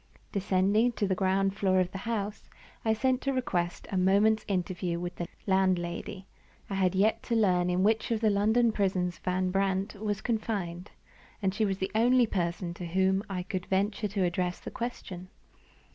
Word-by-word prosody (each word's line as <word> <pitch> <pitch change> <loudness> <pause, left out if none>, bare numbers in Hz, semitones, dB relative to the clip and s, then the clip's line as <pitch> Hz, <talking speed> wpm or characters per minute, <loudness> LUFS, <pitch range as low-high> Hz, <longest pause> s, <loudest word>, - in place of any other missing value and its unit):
DESCENDING 200 +4 +2
to 210 - -1
the 190 - +1
ground 195 +1 +1
floor 190 -2 +2
of 180 -1 0
the 195 - -6
house, 210 -2 -3 0.3
I 220 - +2
sent 255 +3 +1
to 275 - 0
request 175 -9 -2
a 195 - 0
moment's 205 +4 +3
interview 180 -3 -1
with 175 0 -5
the 175 - -3 0.2
landlady. 190 0 0 0.5
I - - -1
had 190 -1 +1
yet 220 +3 +2
to 235 - +2
learn 180 -5 +3
in 180 +1 +1
which 220 +2 +2
of 230 -2 +1
the 215 -1 +3
London 220 +4 +3
prisons 185 -4 0
Van 185 0 0
Brandt 195 0 0
was 205 -1 -3
confined; 205 -6 -3 0.5
and 190 -2 0
she 215 +2 +1
was 195 -2 -1
the 190 0 -3
only 245 +3 +4
person 175 -3 -2
to 175 0 -6
whom 190 +2 +2
I 185 -2 -3
could 185 -1 -4
venture 200 +2 0
to 200 -1 -1
address 180 0 -1
the - - -8
question. 190 -7 -6
195 Hz, 180 wpm, -29 LUFS, 185-215 Hz, 0.5 s, only